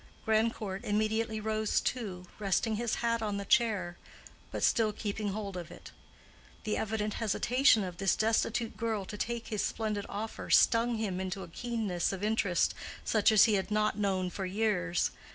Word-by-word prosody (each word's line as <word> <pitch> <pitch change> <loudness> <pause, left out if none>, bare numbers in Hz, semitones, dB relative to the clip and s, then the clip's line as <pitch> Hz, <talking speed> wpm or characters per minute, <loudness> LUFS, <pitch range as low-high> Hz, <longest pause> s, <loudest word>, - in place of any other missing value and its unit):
Grandcourt 220 -3 0
immediately 215 +1 0
rose 215 0 0
too, 195 -8 -3
resting 210 +2 +1
his 235 +1 -1
hat 230 -1 +1
on 210 -2 -1
the 200 - -4
chair, 205 -8 +1 0.5
but - - -4
still 220 -2 +3
keeping 210 0 -3
hold 200 -1 -4
of 175 -2 -6
it. - - -12 0.7
The 215 - -1
evident 215 -1 -2
hesitation 230 +2 +3
of 180 -2 -6
this 195 0 +2
destitute 225 +1 0
girl 220 -4 -2
to 210 - -7
take 235 +2 -3
his 215 -2 -1
splendid 215 -2 -2
offer 215 +2 -5
stung 235 0 +4
him 200 -4 -2
into 190 +1 -4
a - - -9
keenness 215 -4 -2
of 195 0 -5
interest 205 -5 +1 0.3
such 215 -1 +4
as 215 -2 +7
he 220 - +2
had 195 -1 0
not 210 0 +1
known 190 -3 0
for 190 +1 -4
years. 185 -4 0
215 Hz, 170 wpm, -31 LUFS, 195-225 Hz, 0.7 s, as